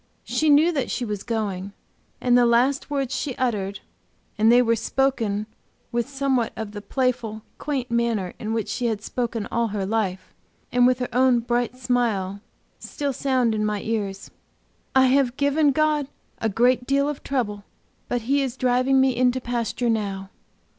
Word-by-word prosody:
She 310 - 0
knew 300 +4 +6
that 275 -6 -2
she 245 - -2
was 210 -3 -4
going, 200 -4 -3 0.5
and 245 -1 +3
the 245 - +6
last 255 +5 +2
words 275 -3 -1
she 270 -5 -3
uttered 200 -6 -2 0.5
and 220 +2 +4
they 245 +1 +6
were 230 -1 +2
spoken 225 -4 0 0.5
with 235 +2 -1
somewhat 270 -4 0
of 220 -2 -5
the 205 0 -7
playful, 230 -3 -1 0.2
quaint 265 -4 -3
manner 230 -6 0
in 215 - -4
which 225 -1 -1
she 235 +4 -1
had 215 -2 -2
spoken 235 -4 -3
all 235 0 +1
her 200 -2 -3
life, 195 -3 -2 0.4
and 245 0 +5
with 255 -1 +3
her 250 -1 -3
own 255 0 +4
bright 240 +1 -1
smile 225 -6 -1 0.4
still 285 -2 -3
sound 255 -3 +1
in 215 0 -1
my 210 -1 -1
ears: 200 -3 -3 0.6
"I 265 0 +6
have 260 -1 +2
given 285 +1 +3
God 300 -1 +1 0.3
a 225 - 0
great 245 +4 +2
deal 280 +1 +2
of 295 -2 -4
trouble, 210 -7 -2 0.4
but 245 - -1
He 280 +4 +2
is 265 -2 -3
driving 255 +2 +3
me 265 -1 +3
into 250 +1 +2
pasture 240 0 -2
now!" 200 -3 -2
240 Hz, 170 wpm, -24 LUFS, 215-260 Hz, 0.6 s, knew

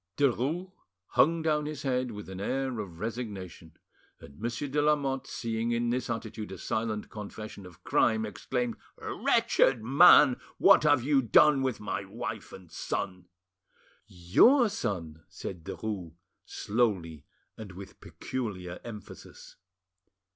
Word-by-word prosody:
Derues 145 +7 0 0.4
hung 160 +6 +3
down 150 -2 +1
his 150 -2 -6
head 130 -2 0
with 105 -2 -8
an 95 0 -7
air 130 +2 -2
of 90 -6 -7
resignation; 100 -7 -6 0.4
and 70 +1 -14
Monsieur 120 +5 -3
de 145 +2 0
Lamotte, 140 -3 +1
seeing 115 0 -2
in 120 0 0
this 125 -1 -2
attitude 110 -3 -5
a 95 - -7
silent 110 +2 -3
confession 105 -2 -8
of 85 -3 -17
crime, 110 -1 +2
exclaimed, 120 +4 -3 0.2
"Wretched 125 -5 +2
man! 135 0 +7 0.2
what - - +6
have 145 -5 +4
you 140 0 +3
done 135 +4 +5
with 130 -3 -1
my 105 -2 -3
wife - - -6
and 95 - -11
my 85 - -22
son?" 90 -2 -4 0.8
"Your 210 - +4
son!—" 85 - -4
said 90 -2 -7
Derues 95 -4 -5 0.3
slowly 95 - -1 0.3
and 105 -4 -9
with 95 +1 -11
peculiar 95 -9 -5
emphasis. 105 -3 -11
115 Hz, 135 wpm, -29 LUFS, 95-135 Hz, 0.8 s, man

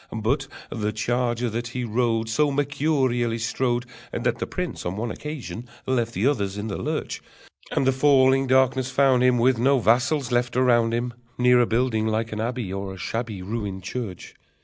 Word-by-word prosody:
But 130 +6 -1 0.2
the 105 -2 -1
charger 120 +2 0
that 120 +2 -3
he 125 +1 -4
rode 115 0 0
So 145 +6 +2
mercurially 135 -5 0
strode 120 +1 0 0.3
That - - -1
the - - -2
prince - - -4
on 90 +2 -3
one 115 +1 -2
occasion 140 -5 -6 0.2
left 120 -3 0
the 100 - 0
others 105 -8 0
in 105 +2 -4
the 100 - -3
lurch, - - -3 0.5
And - - +1
the 135 - +4
falling 135 -1 +4
darkness 130 0 +3
found 130 -1 +3
him, 125 -1 +4
With 120 0 +3
no 135 +3 +4
vassals 130 +4 +2
left 120 0 0
around 120 -3 +4
him, 120 +1 -1 0.2
Near 125 0 +5
a 120 - +2
building 115 -2 +1
like 110 +1 -1
an 105 0 -3
abbey, 115 -4 -3
Or 95 0 -4
a 95 - -8
shabby 110 0 -4
Ruined 100 -2 -4
church. 100 -2 -6
120 Hz, 180 wpm, -24 LUFS, 110-130 Hz, 0.5 s, Near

